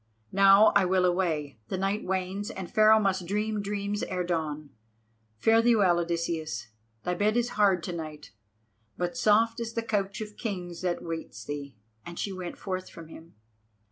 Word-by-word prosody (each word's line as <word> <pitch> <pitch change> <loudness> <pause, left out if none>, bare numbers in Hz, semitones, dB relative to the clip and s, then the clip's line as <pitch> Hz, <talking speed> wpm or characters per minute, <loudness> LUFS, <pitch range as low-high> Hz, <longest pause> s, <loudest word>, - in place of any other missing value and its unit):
Now 195 +2 +7
I 200 - +6
will 185 0 +2
away—the 160 - -1
night 195 +3 -1
wanes 190 +2 -2
and 190 -3 -7
Pharaoh 215 0 +6
must 190 -4 0
dream 210 +2 -1
dreams 205 0 -3
ere 180 -1 -2
dawn. 155 -4 -3 0.7
Fare 225 - +4
thee 235 0 +4
well, 185 -5 +4
Odysseus. 165 -8 -3 0.3
Thy 180 - -1
bed 210 +5 +1
is 240 0 +1
hard 195 -6 +2
to 180 - -4
night, 155 -5 -7 0.7
but 175 +3 -2
soft 225 0 +3
is 230 -1 -4
the 230 - -2
couch 200 -3 -1
of 210 -1 -7
kings 180 -6 -5
that 180 -2 -2
waits 160 -10 -6
thee," 140 -3 -6 0.3
and 170 0 -9
she 200 - -2
went 180 -2 -6
forth 185 -1 -4
from 165 -1 -12
him. 165 -2 -13
185 Hz, 170 wpm, -28 LUFS, 170-210 Hz, 0.7 s, Now